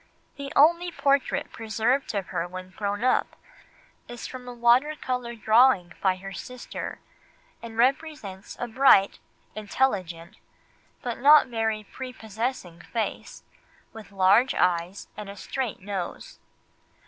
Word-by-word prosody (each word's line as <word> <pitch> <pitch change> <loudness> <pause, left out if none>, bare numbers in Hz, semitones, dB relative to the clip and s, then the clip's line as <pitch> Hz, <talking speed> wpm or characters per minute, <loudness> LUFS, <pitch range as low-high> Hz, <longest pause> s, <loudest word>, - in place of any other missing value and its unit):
The 280 -1 -7
only 340 +4 +4
portrait 275 -2 0
preserved 225 +3 -1
of 195 -2 -3
her 170 - -2
when 185 +1 -9
grown 205 +2 -3
up 255 - +1 0.7
is 240 -1 -8
from 255 -1 -8
a - - -5
water 245 +5 +3
colour 250 -4 -4
drawing 220 -5 +4
by 190 -2 +2
her 195 +1 -9
sister, 250 +4 -7 0.6
and 230 -1 -9
represents 250 -6 -1
a 245 - -3
bright, 230 -5 +4 0.3
intelligent, 195 -6 -2 0.7
but 240 -3 -4
not 290 +3 +7
very 220 -2 -1
prepossessing 220 -6 -5
face, 225 +3 -5 0.5
with 220 -2 -11
large 200 +7 +4
eyes 180 +2 0
and 210 -1 -8
a 200 - -8
straight 255 0 -4
nose. 190 -2 -6
225 Hz, 125 wpm, -26 LUFS, 195-255 Hz, 0.7 s, not